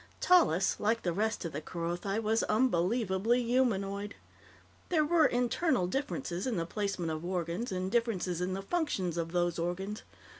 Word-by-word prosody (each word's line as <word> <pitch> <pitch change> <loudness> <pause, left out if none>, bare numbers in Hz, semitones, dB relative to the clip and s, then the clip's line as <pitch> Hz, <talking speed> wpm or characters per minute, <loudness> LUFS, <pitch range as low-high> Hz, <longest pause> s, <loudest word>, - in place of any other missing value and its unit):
Tallis, 195 - +4
like 225 +2 +1
the 175 - 0
rest 215 +1 -1
of 165 - -3
the 145 - -4
Kerothi, 175 +5 -3
was 225 0 +1
unbelievably 220 +1 +2
humanoid. 205 -5 0 0.7
There 315 -4 +3
were 325 0 +4
internal 245 - +1
differences 260 -4 -3
in 235 -6 -1
the 165 - -1
placement 195 -3 -2
of 155 +1 -4
organs, 180 +5 -2
and 185 0 -2
differences 195 -7 0
in 185 +1 -1
the 195 - -5
functions 195 - -1
of 165 -1 -2
those 175 -1 0
organs. 190 +5 -3
195 Hz, 155 wpm, -31 LUFS, 175-235 Hz, 0.7 s, Tallis